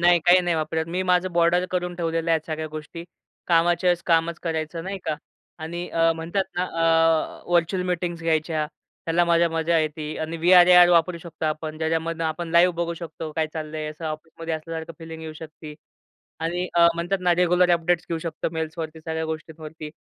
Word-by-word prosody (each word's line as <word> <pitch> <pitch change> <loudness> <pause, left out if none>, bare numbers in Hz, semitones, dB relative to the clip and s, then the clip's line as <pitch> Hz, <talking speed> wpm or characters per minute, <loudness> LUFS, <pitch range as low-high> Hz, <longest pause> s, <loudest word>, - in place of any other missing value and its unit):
नाही, 175 0 +5
काही-नाही 175 0 +4
वापरत. 160 +1 -1
मी 180 +2 -1
माझं 180 0 +1
बॉर्डर 170 +1 +3
करून 180 -1 -2
ठेवलेल्या 165 -1 0
आहेत 160 -1 -3
सगळ्या 155 -1 -3
गोष्टी. 155 +2 -8 0.4
कामाच्या 175 +1 +3
वेळेस 175 -1 +2
कामच 165 0 +2
करायचं, 165 0 -3
नाही 195 0 -4
का? 155 - -1 0.4
आणि 170 +2 -5
अ, 165 0 +2
म्हणतात 170 +4 -2
ना, 180 - +1
अ, 165 -2 +2
व्हर्चुअल 175 +2 +2
मीटिंग्स 175 -1 -2
घ्यायच्या. 160 -1 0 0.4
त्याला 170 +1 +3
माझ्या 170 0 +3
मजा 165 +1 +1
येती 155 0 -3
आणि 160 +1 -3
वी-आर 175 +2 +6
ए-आर 180 -1 +8
वापरू 170 0 +3
शकतो 165 -1 -8
आपण, 155 0 -3
ज्याच्यामधनं 165 +1 -1
आपण 160 +2 -3
लाईव्ह 170 +1 +5
बघू 170 0 -2
शकतो 160 -1 -7
काय 160 0 0
चाललंय 155 -1 -5
असं 155 +2 -10
ऑफिसमध्ये 160 +1 -5
असल्यासारखं 160 +1 -6
फीलिंग 160 0 -9
येऊ 160 -1 -6
शकते. 155 -1 -10 0.7
आणि 175 +3 -2
अ, 170 0 +6
म्हणतात 175 +3 -1
ना, 175 -1 +3
रेग्युलर 180 0 +3
अपडेट्स 170 0 +1
घेऊ 165 - -1
शकतो 160 -1 -3
मेल्सवरती, 160 0 -4
सगळ्या 160 0 -3
गोष्टींवरती. 160 0 -7
165 Hz, 175 wpm, -24 LUFS, 160-175 Hz, 0.7 s, ए-आर